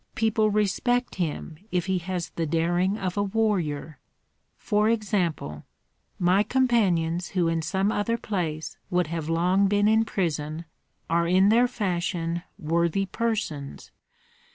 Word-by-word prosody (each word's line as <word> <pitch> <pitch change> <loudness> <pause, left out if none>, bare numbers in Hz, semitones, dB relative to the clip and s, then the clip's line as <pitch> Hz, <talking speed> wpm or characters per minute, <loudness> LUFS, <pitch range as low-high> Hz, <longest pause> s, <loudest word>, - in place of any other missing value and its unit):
People 220 -1 +2
respect 215 +4 0
him 155 -1 -3
if 180 -2 0
he 190 -1 0
has 180 0 -4
the 165 -1 -2
daring 175 +5 +1
of 185 -2 -3
a - - +3
warrior. 190 -8 -1 0.6
For 210 0 +1
example, 180 - -1 0.5
my 180 +3 +3
companions 190 -9 +1
who 180 -3 +1
in 165 0 0
some 190 +5 0
other 225 +3 0
place 165 -8 -3
would 180 0 +2
have 160 0 -4
long 180 +4 +3
been 205 +1 +3
in 220 +1 +4
prison 160 -6 -2 0.4
are 170 +1 +1
in 185 +3 +4
their 240 +3 +5
fashion 175 -6 -2 0.2
worthy 170 +2 0
persons. 195 - -3
180 Hz, 130 wpm, -26 LUFS, 165-210 Hz, 0.6 s, their